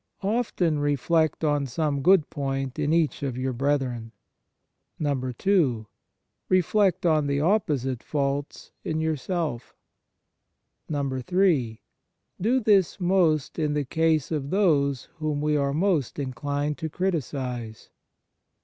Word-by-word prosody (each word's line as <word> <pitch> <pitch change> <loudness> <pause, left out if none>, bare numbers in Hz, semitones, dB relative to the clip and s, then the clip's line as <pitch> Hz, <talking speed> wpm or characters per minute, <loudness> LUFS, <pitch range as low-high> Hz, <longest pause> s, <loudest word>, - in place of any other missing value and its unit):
OFTEN 195 -7 0
reflect 150 +3 +1
on 145 -2 +1
some 140 +2 -1
good 180 0 +5
point 135 -1 -3
in 150 0 0
each 160 -2 +1
of 135 -3 -3
your 130 0 -2
brethren. 125 -3 -1 0.9
2. 130 - 0 0.6
Reflect 185 +1 +2
on 155 -3 +3
the 140 0 0
opposite 145 - 0
faults 140 -1 -3
in 155 -1 -2
your 160 0 0
self. 150 -5 -4 1.1
3. 140 - 0 0.6
Do 240 +7 +3
this 200 - +3
most 175 -5 +1
in 150 -2 0
the 145 -1 0
case 160 +1 +1
of 145 -3 -2
those 145 -9 +2
whom 155 -2 -2
we 150 0 +1
are 140 -1 +1
most 160 - 0
inclined 145 +2 -3
to 160 - -3
criticize. 130 - -3
150 Hz, 115 wpm, -25 LUFS, 135-165 Hz, 1.1 s, good